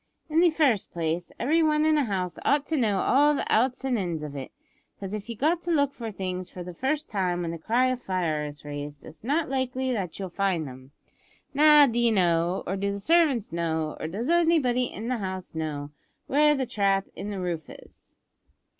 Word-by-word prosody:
"In 315 - +3
the 350 0 +6
first 285 - +1
place, 170 +1 -2
every 315 +7 +2
one 305 -1 +3
in 310 0 +4
a 295 -3 +2
house 185 -4 -3
ought 290 0 +2
to 320 - -1
know 215 -8 +1
all 295 +2 +4
the - - -2
outs 250 +4 +2
and 250 -4 +1
ins 170 -5 -3
of 145 -1 -6
it, 135 -2 -6 0.5
'cause 195 0 -6
if 215 +1 -5
you've 230 - -5
got 325 +7 +1
to 345 - -3
look 285 -3 +2
for 230 -2 -6
things 185 -2 -4
for 180 - -8
the 180 0 -8
first 290 - -1
time 180 -3 -1
when 165 - -3
the 165 - -6
cry 235 +9 +2
of 255 -1 -2
`Fire' 160 -7 -1
is 145 0 -13
raised, 145 0 -7
it's 155 +3 -13
not 295 +7 0
likely 260 -1 -1
that 190 -7 -3
you'll 195 - -4
find 180 -4 -1
'em. 130 0 -11 0.6
Now, 300 0 +7
d'ye 235 -2 +2
know, 175 -3 +2
or 195 - -2
do 200 +1 -1
the 200 - -4
servants 295 -4 +2
know, 160 -2 -2
or - - -3
does 205 +9 -4
anybody 320 -7 +3
in 225 -1 -6
the 250 0 0
house 185 -2 -5
know, 150 -3 -4 0.3
where 295 +2 +4
the 265 -2 -1
trap 200 -5 +1
in 205 - -5
the 200 -2 -4
roof 170 -4 -4
is?" - - -15
205 Hz, 215 wpm, -26 LUFS, 175-270 Hz, 0.6 s, Now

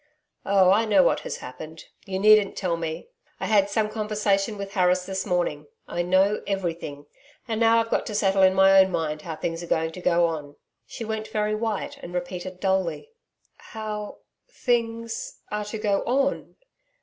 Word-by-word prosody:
'Oh, 195 -2 +5
I 215 +4 +3
know 200 -4 +5
what - - +2
has - - -5
happened. 155 +6 -10 0.2
You 190 -1 -2
needn't 210 0 +5
tell 180 -3 -1
me. 165 - -5 0.3
I - - -3
had 200 -2 +3
some 215 +1 +1
conversation 210 -1 -1
with 200 0 -6
Harris 180 -1 +2
this 190 +2 -3
morning. 170 -5 -1 0.2
I 175 - -2
know 190 +4 +2
EVERYTHING; 170 -7 -3 0.4
and 220 -2 -2
now 230 0 +5
I've 230 0 -2
got - - 0
to 210 - -4
settle 195 -1 +2
in 190 0 +5
my 195 0 +6
own 190 0 +2
mind 155 -3 -2
how 160 0 -6
things 165 +1 -4
are 160 -1 0
to 180 - -9
go 175 -1 +3
on.' 150 -3 -4 0.3
She 230 - -7
went 220 0 -4
very 210 0 -1
white 215 -1 -3
and 175 - -8
repeated 180 +1 -5
dully: 190 - -1 0.5
'How 215 -1 -6 0.3
things 230 - -2
are 210 0 -2
to 210 +2 -5
go 205 -2 0
on?' 275 +3 0
195 Hz, 175 wpm, -25 LUFS, 175-215 Hz, 0.5 s, my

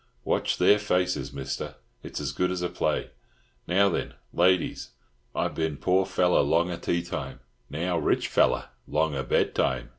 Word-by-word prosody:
Watch - - 0
their 105 - +5
faces, 90 -3 0
Mister, 70 -1 -5 0.3
it's - - -6
as - - -2
good 90 - 0
as 90 -1 -2
a 90 - 0
play. - - -1 0.6
Now 95 +3 +4
then, 95 - -2 0.2
ladies, 90 0 +2 0.5
I - - +1
bin 80 -3 -2
poor 95 +4 +2
fella 90 -1 +3
longa 85 +4 +2
teatime, 85 0 -3 0.3
now 85 +3 -1
rich 75 - +1
feller - - +2 0.2
longa 75 -2 0
bedtime. 65 0 0
85 Hz, 145 wpm, -27 LUFS, 75-90 Hz, 0.6 s, their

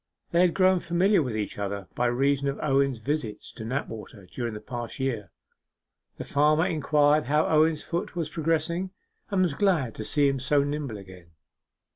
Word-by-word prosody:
They 170 - +4
had 180 -2 +3
grown 185 -1 +4
familiar 175 +3 +2
with 125 -6 -2
each 105 -1 -4
other 100 -2 -4
by 125 - +1
reason 140 +3 +1
of 140 - -3
Owen's 135 -3 +2
visits 120 -2 -4
to 110 - -8
Knapwater 110 -4 -5
during 115 +4 -5
the - - -5
past 120 +2 -6
year. 120 -8 -2 0.9
The - - -5
farmer 150 +3 +3
inquired 150 -1 +2
how 150 +2 +2
Owen's 155 0 +3
foot 170 +1 -4
was 165 -3 -2
progressing, 165 +3 -1 0.4
and 195 -3 +2
was 175 -5 +1
glad 155 - +1
to 110 - -6
see 145 +5 +2
him 135 -1 0
so 140 +2 +2
nimble 145 -5 -3
again. 90 -4 -13
140 Hz, 175 wpm, -26 LUFS, 120-160 Hz, 0.9 s, They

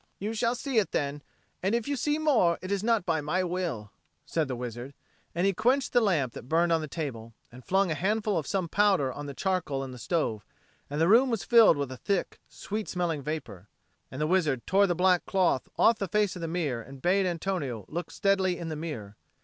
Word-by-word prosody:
"You 210 +3 -3
shall 230 +2 0
see 255 -2 0
it 205 - -2
then; 145 0 -1 0.4
and 195 +5 +1
if 235 -2 -2
you 285 - 0
see 295 +3 0
more, 250 - +3
it 185 - -5
is 200 0 0
not 230 -5 +2
by 160 -3 0
my 175 +6 0
will," 170 - -3 0.3
said 160 -3 -1
the 130 - -3
wizard; 120 +2 -6 0.4
and 175 +2 +1
he 195 - +3
quenched 250 +7 +1
the 245 - +5
lamp 155 - +1
that 125 - -10
burned 170 +2 +3
on 165 -1 +3
the 155 - -4
table, 115 -8 -6 0.2
and 125 +1 -13
flung 190 +4 +2
a - - +2
handful 210 +5 0
of 160 -4 -2
some 190 -3 -1
powder 190 -9 +2
on 145 +2 -7
the 140 - -7
charcoal 175 -8 -1
in 135 - -7
the 125 - -10
stove; 115 - -1 0.5
and 145 +1 -3
the 165 - +4
room 240 +7 +6
was 225 -8 -1
filled 225 -5 +6
with 140 -2 -3
a 130 - -7
thick 195 +7 -2
sweet 210 +1 -5
smelling 170 -5 -1
vapour. 130 - -6 0.4
And 130 - -8
the 150 - +1
wizard 155 -7 +1
tore 200 +1 +4
the 175 - 0
black 180 0 +3
cloth 185 -9 +1
off 230 0 +4
the 195 - -2
face 210 -1 +1
of 180 - -7
the 165 - -2
mirror 155 -8 -2
and 135 +3 -12
bade 185 +6 +2
Antonio 165 - -3
look 170 +1 -5
steadily 190 -2 +1
in 165 -1 -5
the 155 - -3
mirror. 115 -11 -6
175 Hz, 230 wpm, -28 LUFS, 140-200 Hz, 0.5 s, room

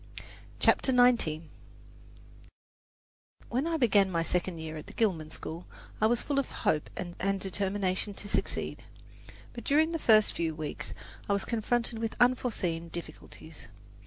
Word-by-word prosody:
CHAPTER 265 - +4
XIX 240 -11 +4 2.1
When 260 +6 0
I 330 -1 0
began 205 -8 +4
my 170 -2 0
second 180 0 -1
year 160 0 -6
at 155 - -8
the - - -11
Gilman 175 -9 0
school, 160 +2 -7 0.3
I 215 - +6
was 240 +1 +2
full 280 -1 0
of 275 - -2
hope 150 - 0
and 195 +3 -2
determination 195 +1 -1
to 205 - -6
succeed. - - -1 0.7
But 235 - -8
during 310 +5 +3
the 330 - -2
first 215 -6 +5
few 165 -2 -2
weeks 155 -1 -5 0.3
I - - +4
was 200 - 0
confronted 230 0 0
with 225 -1 -3
unforeseen 210 -10 +1
difficulties. 160 -1 -9
200 Hz, 140 wpm, -30 LUFS, 170-240 Hz, 2.1 s, I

